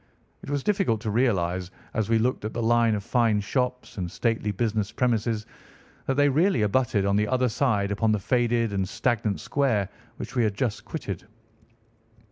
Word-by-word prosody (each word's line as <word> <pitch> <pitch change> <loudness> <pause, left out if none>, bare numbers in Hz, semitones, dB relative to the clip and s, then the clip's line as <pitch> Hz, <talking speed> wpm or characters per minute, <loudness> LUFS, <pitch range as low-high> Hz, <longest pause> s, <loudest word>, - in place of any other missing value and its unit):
It - - -9
was 145 -2 -1
difficult 195 - +1
to 110 -3 -2
realise 95 -7 +1 0.2
as 110 -1 -1
we 115 - +4
looked 120 +1 0
at 110 - -4
the 120 - -1
line 115 -1 +3
of 100 - -4
fine 115 -2 +2
shops 125 +2 -2
and 90 -2 -2
stately 115 +1 -1
business 105 0 -1
premises 115 -3 0 0.6
that 135 - +1
they 145 +1 +4
really 150 - +3
abutted 105 -2 +1
on 100 0 +2
the 105 0 +2
other 130 +1 +1
side 105 -5 +1
upon 110 +2 +1
the 105 - +2
faded 115 +1 +1
and 95 -1 -1
stagnant 110 -4 0
square 115 -9 0 0.3
which - - -7
we 120 - +3
had 105 -2 0
just 115 0 -2
quitted. 100 - -6
115 Hz, 180 wpm, -26 LUFS, 105-125 Hz, 0.6 s, we